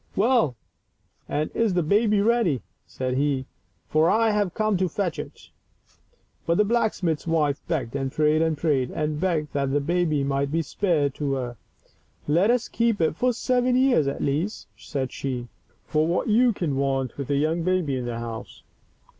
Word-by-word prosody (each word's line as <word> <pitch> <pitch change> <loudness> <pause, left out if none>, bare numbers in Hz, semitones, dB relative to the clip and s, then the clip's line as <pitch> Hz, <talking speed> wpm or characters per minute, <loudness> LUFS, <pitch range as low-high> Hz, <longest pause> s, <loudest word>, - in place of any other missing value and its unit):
" - - -30
Well, 225 - +3 0.7
and 150 +1 -1
is 220 -5 +1
the 175 - +2
baby 210 +4 +3
ready? 215 - +2 0.2
said 130 0 -3
he, 140 -2 0 0.4
"for 155 +2 +3
I 225 +2 +3
have 205 -4 0
come 215 -1 +1
to 185 0 0
fetch 180 0 -2
it." - - -9 1.0
But 170 +1 +2
the 210 - +5
blacksmith's 200 -9 0
wife 150 -4 +1
begged 135 -7 -2
and 135 -1 -2
prayed 155 +2 +2
and 160 -2 +1
prayed 140 -5 +1
and 150 -1 -2
begged 160 -5 -1
that 140 -1 0
the 145 - +2
baby 155 -1 0
might 140 0 -1
be 165 +1 0
spared 150 -4 0
to 140 -1 -2
her. 125 -3 -4 0.4
" - - -38 0.3
Let 170 +8 +3
us 245 0 +2
keep 230 -2 0
it 160 -2 +1
for 250 +7 +2
seven 250 +1 +1
years 255 - +3
at 140 - -2
least,'* 155 +10 -1
said 130 -2 -4
she, 125 -3 -4 0.2
" 120 - -38
for 155 +1 +1
what 175 +7 0 0.3
can 170 -6 -1
you - - -1
want 135 -2 -1
with 140 - -4
a 140 - +2
young 155 +4 +1
baby 175 -5 0
in 125 -1 -3
the 120 -1 -3
house? 115 -1 -7
155 Hz, 190 wpm, -25 LUFS, 140-200 Hz, 1.0 s, the